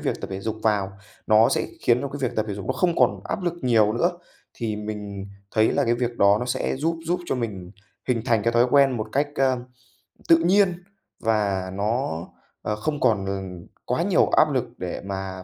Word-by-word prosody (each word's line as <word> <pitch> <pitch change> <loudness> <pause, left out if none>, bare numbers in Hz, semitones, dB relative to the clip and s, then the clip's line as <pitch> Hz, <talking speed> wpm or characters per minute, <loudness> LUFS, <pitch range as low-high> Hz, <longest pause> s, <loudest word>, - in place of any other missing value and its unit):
việc - - -2
tập - - -6
thể 95 0 -4
dục 110 +2 -3
vào, 100 -3 +1 0.3
nó 110 +1 +6
sẽ - - 0
khiến 120 +1 +3
cho 140 - -3
cái 145 - -7
việc 120 - -11
tập 110 - +1
thể 100 - -3
dục 100 -1 -7
nó - - +1
không 175 -2 +1
còn - - +3
áp 200 - -3
lực 175 -1 -1
nhiều 110 -4 +3
nữa. 170 +10 +1 0.4
Thì 110 -3 -3
mình 105 -2 -6 0.2
thấy 110 0 +3
là - - +2
cái 120 0 +2
việc 120 -1 -2
đó 100 +1 +5
nó 125 - -3
sẽ 125 - -1
giúp 165 +4 -1
giúp 180 +1 0
cho - - 0
mình 100 -7 -4 0.4
hình 115 -3 +1
thành 115 -5 +2
cái 115 - +1
thói 120 +1 +4
quen 135 -3 +5
một 110 0 -3
cách, 145 +2 +1
a, 135 -2 +2 0.7
tự 165 - +7
nhiên, 180 +1 +2 0.4
và 100 -4 0
nó, 105 - -1 0.4
ờ, 105 - -2
không 145 +7 -3
còn, 100 -4 +2
ừm, 95 -3 -5 0.2
quá - - 0
nhiều - - +3
áp - - +4
lực - - +1
để - - -5
mà 95 -1 -5
110 Hz, 220 wpm, -24 LUFS, 100-135 Hz, 0.7 s, tự